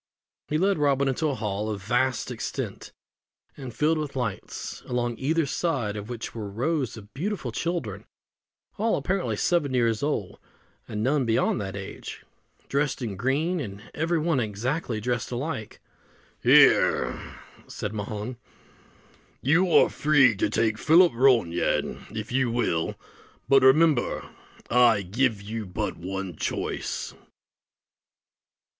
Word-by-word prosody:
He 150 - 0
led 195 +1 +2
Robin 140 -1 +2
into 135 +4 0
a 140 - -1
hall 105 -2 -2
of 100 -2 -4
vast 125 +3 0
extent, - - -5 0.6
and 130 -4 -7
filled 155 +5 +1
with 150 -3 -4
lights; 120 -7 -4
along 120 -1 -1
either 160 +4 +1
side 135 - -1
of 105 +1 -6
which 120 -2 -6
were 110 -3 -5
rows 130 +3 -1
of 105 -1 -13
beautiful 165 - -3
children, 170 +8 -3 0.7
all 225 +2 +2
apparently 190 0 -1
seven 145 -7 +1
years 115 -3 +2
old, 140 -10 -2 0.5
and 105 0 -3
none 135 +1 +2
beyond 110 -1 +1
that 95 -1 -5
age, 95 -1 -8 0.4
dressed 140 -2 -1
in 105 -5 -3
green, 145 - 0
and 105 -6 -6
every 165 +2 0
one 160 -3 +1
exactly 115 +3 -2
dressed 120 +1 -2
alike. 125 -3 -4 0.6
"Here," - - +4 0.3
said 105 0 -5
Mahon, 105 +3 -5 1.1
"you 165 +7 +3
are - - +6
free 145 -6 +4
to 100 - +1
take 110 0 +1
Philip 170 +3 +6
Ronayne, 115 -9 +2
if 110 +1 -5
you 130 -1 +2
will; 115 -9 0 0.5
but, 135 -1 +6
remember, 140 0 +4 0.4
I 120 -4 +4
give 110 +2 0 0.3
but - - -1
one 95 0 -5
choice." - - -3
125 Hz, 130 wpm, -26 LUFS, 110-150 Hz, 1.1 s, are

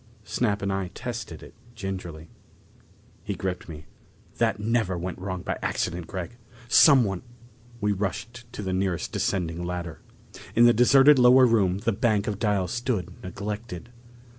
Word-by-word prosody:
Snap 105 -2 -1
and 100 0 -1
I 95 -1 -2
tested 120 -10 -6
it - - -13 0.2
gingerly. 95 -7 -6 1.0
He 100 - -4
gripped 95 -2 -4
me. 75 -1 -9 0.5
"That 110 -3 +1
never 110 -4 0
went 90 +2 -5
wrong 95 -1 -5
by - - -3
accident, 85 -2 -2
Gregg! 95 +4 -6 0.3
Someone 120 - +5 0.3
" 120 +1 -25
We 105 0 +1
rushed 115 +5 -4
to 105 - -6
the 95 -1 -2
nearest 95 -2 -1
descending 85 -2 -2
ladder. 85 -2 -5 0.5
In 120 - +6
the 120 - +6
deserted 135 +4 +6
lower 125 +1 +7
room 100 -6 +2
the 105 +3 0
bank 105 -1 +1
of 105 -2 -3
dials 100 -5 0
stood 120 -7 -2
neglected. 100 +1 -6
100 Hz, 150 wpm, -26 LUFS, 90-120 Hz, 1.0 s, lower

